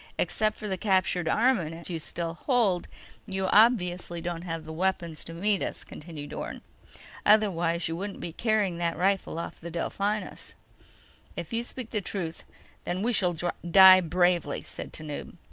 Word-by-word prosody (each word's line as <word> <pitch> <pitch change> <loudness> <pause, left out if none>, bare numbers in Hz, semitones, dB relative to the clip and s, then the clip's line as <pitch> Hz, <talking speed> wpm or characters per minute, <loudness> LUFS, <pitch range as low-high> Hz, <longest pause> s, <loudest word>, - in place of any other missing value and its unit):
"Except 215 -1 0
for 210 - -6
the 190 -2 -3
captured 185 -4 +1
armament 170 -6 +1
you 170 -3 -3
still 165 +1 -4
hold, 200 - +1 0.4
you 190 -1 -1
obviously 185 -6 +3
don't 170 0 -4
have 165 -2 -5
the 160 - -7
weapons 170 -2 -1
to - - -8
meet 200 +3 +1
us," - - -4
continued 150 -2 -9
Orne. - - -5 0.6
"Otherwise, 175 -6 +3
you 165 - -3
wouldn't 195 +3 -5
be 170 - -6
carrying 210 -5 0
that 170 -1 -1
rifle 195 -2 0
off 170 - -6
the 170 - -6
Delphinus." 200 +5 -3 0.8
"If - - -6
you 230 - +1
speak 245 -1 -7
the 210 - -1
truth, 175 -4 -4 0.4
then 185 +3 -2
we 240 +2 +1
shall 180 -5 +3 0.3
die 190 +1 +9
bravely," 175 -3 +1
said - - -7
Tanub. 150 -2 -7
180 Hz, 160 wpm, -28 LUFS, 170-205 Hz, 0.8 s, die